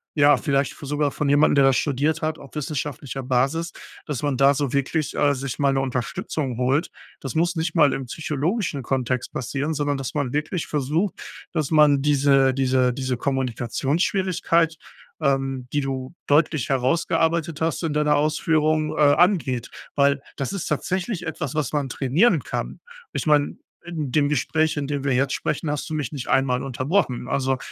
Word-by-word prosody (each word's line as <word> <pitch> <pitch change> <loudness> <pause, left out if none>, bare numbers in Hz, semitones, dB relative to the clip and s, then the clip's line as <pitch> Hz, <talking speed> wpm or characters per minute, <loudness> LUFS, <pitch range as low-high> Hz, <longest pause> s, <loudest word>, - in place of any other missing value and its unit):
ja, 145 -2 +5
vielleicht 140 -1 0
v - - -11
sogar 145 +1 0
von 145 +1 -2
jemandem, 145 +2 +4
der 140 - +5
das 135 -1 +4
studiert 150 +3 0
hat, 155 0 -1
auf 140 - -14
wissenschaftlicher 140 -2 -4
Basis, 135 +7 0 0.3
dass 145 -5 -4
man 145 -3 -1
da 135 +2 +5
so 140 -2 -1
wirklich, 140 +2 -1
äh, 145 -1 +3
sich 135 -1 -4
mal 140 -2 +2
'ne 135 - +1
Unterstützung 130 +1 -3
holt. 135 +6 +1 0.3
Das 135 - -5
muss 170 +2 +1
nicht 160 +2 -1
mal 150 -5 +4
im 135 - -4
psychologischen 155 - -2
Kontext 130 -1 -1
passieren, 140 +5 -2
sondern 145 -1 -1
dass 135 -2 -5
man 145 -4 -1
wirklich 155 +4 -2
versucht, 155 +7 -1 0.4
dass 155 -4 -2
man 150 -3 +5
diese 140 -2 +4
diese 130 -1 +2
diese 130 -1 -2
Kommunikationsschwierigkeit, 155 - 0 0.4
ähm, 135 -3 0
die 145 - +2
du 135 0 -4
deutlich 150 -2 +2
herausgearbeitet 160 +4 +1
hast 160 -2 0
in 165 -3 -1
deiner 150 0 +2
Ausführung, 155 +1 +1
äh, - - 0
angeht, 155 - +1 0.2
weil, 140 0 +3 0.2
das 135 +6 -3
ist 195 - -4
tatsächlich 180 - -2
etwas, 155 -3 -4
was 150 -3 -1
man 145 -3 -1
trainieren 140 - +2
kann. - - -5 0.3
Ich - - -2
meine, 150 -2 +2 0.3
in 160 -6 -4
dem 145 -2 +3
Gespräch, 155 +2 +1
in 145 - -1
dem 145 -1 -2
wir 140 - 0
jetzt 135 +2 +1
sprechen, 155 +1 -2
hast 150 - -3
du - - -4
mich 150 -2 -3
nicht 135 -4 -5
einmal 125 -2 +2
unterbrochen. 130 0 -1
Also 135 0 0
145 Hz, 175 wpm, -23 LUFS, 135-155 Hz, 0.4 s, ja